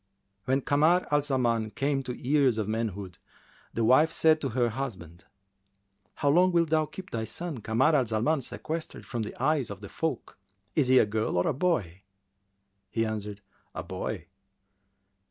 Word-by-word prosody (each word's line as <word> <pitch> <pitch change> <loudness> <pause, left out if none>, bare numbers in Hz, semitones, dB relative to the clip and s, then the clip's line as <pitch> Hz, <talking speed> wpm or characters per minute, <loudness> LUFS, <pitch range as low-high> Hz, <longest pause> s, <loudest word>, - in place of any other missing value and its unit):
When 135 +3 +1
Kamar 155 +7 +3
al 145 0 +4
Zaman 120 -6 0
came 140 0 0
to 125 -2 -6
years 135 -3 +2
of 110 -2 -1
manhood, 100 -5 -3 0.5
the 115 - -1
wife 150 +7 +5
said 160 -1 +4
to 135 - -1
her 120 0 +1
husband, 95 - -6 0.9
"How 145 - +1
long 180 +4 +4
wilt 170 -2 +2
thou 155 -1 +2
keep 190 +3 -10
thy 115 -1 -2
son 155 +5 -4
Kamar 120 +9 +2
al 130 -5 +2
Zaman 120 +8 +1
sequestered 160 +5 -5
from 120 - -4
the 105 - -6
eyes 140 -1 +1
of 100 -2 -7
the 100 -1 -9
folk? 160 -11 -4 0.4
Is 145 -5 +3
he 130 0 +5
a - - +6
girl 110 -2 -1
or 90 - +2
a - - +1
boy?" 120 - -1 0.9
He 115 +3 0
answered, 105 -2 -5 0.3
"A - - -4
boy." - - -5
130 Hz, 170 wpm, -28 LUFS, 110-150 Hz, 0.9 s, a